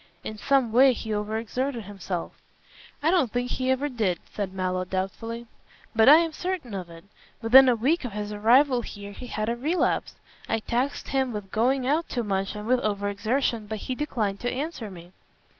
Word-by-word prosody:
In 215 - -5
some 255 +2 +2
way 260 +3 +6
he 220 -2 -4
over 210 +1 -2
exerted 240 +2 -3
himself." 190 -3 -5 0.7
"I 320 - +4
don't 320 - +2
think 245 +1 -2
he 255 0 -1
ever 260 +2 +1
did," 215 -10 0 0.2
said 200 -3 -3
Mallow, 185 -1 -1
doubtfully. 205 +6 -4 0.5
"But 225 +3 +6
I 295 - +11
am 330 -1 +1
certain 350 - -4
of 185 -3 -5
it. 165 +1 -13 0.3
Within 255 +3 +7
a 245 - +4
week 280 +10 +1
of 245 -5 -5
his 210 0 -4
arrival 245 +5 +4
here 205 -3 -8
he 250 +5 -9
had 215 -2 -3
a 235 - 0
relapse. 305 +9 0 0.3
I 225 - +2
taxed 245 +5 -2
him 265 -2 0
with 205 -2 -6
going 255 +4 +1
out 305 +5 +1
too 240 - -2
much 195 -1 -2
and 210 0 -6
with 250 +2 +3
over 205 -2 -1
exertion, 220 +2 -1
but 220 +1 -4
he 255 - -4
declined 225 -8 -2
to 245 - -2
answer 270 -5 -4
me." 175 -2 -12
230 Hz, 195 wpm, -26 LUFS, 205-260 Hz, 0.7 s, I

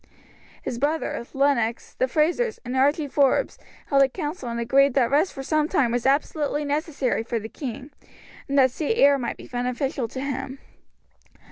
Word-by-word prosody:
His 235 - -4
brother, 295 -2 -1
Lennox, 270 -5 0
the 255 - 0
Frazers, 345 - +1
and 250 +2 -4
Archie 290 +4 +2
Forbes 275 -1 +1 0.3
held 275 -1 +3
a 270 - +5
council 295 -3 -5
and 235 0 -3
agreed 270 +3 +3
that 255 -3 +2
rest 305 +6 +3
for 270 - -7
some 305 +2 +1
time 245 -4 +2
was 245 +1 0
absolutely 295 +1 0
necessary 285 -4 -1
for 230 +1 -3
the 220 0 -5
king, 265 +2 -7 0.6
and 280 - 0
that 260 -2 +5
sea 310 - -1
air 280 -9 +5
might 240 -2 -3
be - - -11
beneficial 250 +1 -2
to 260 - -7
him. 270 -1 -4
275 Hz, 170 wpm, -24 LUFS, 250-295 Hz, 0.6 s, a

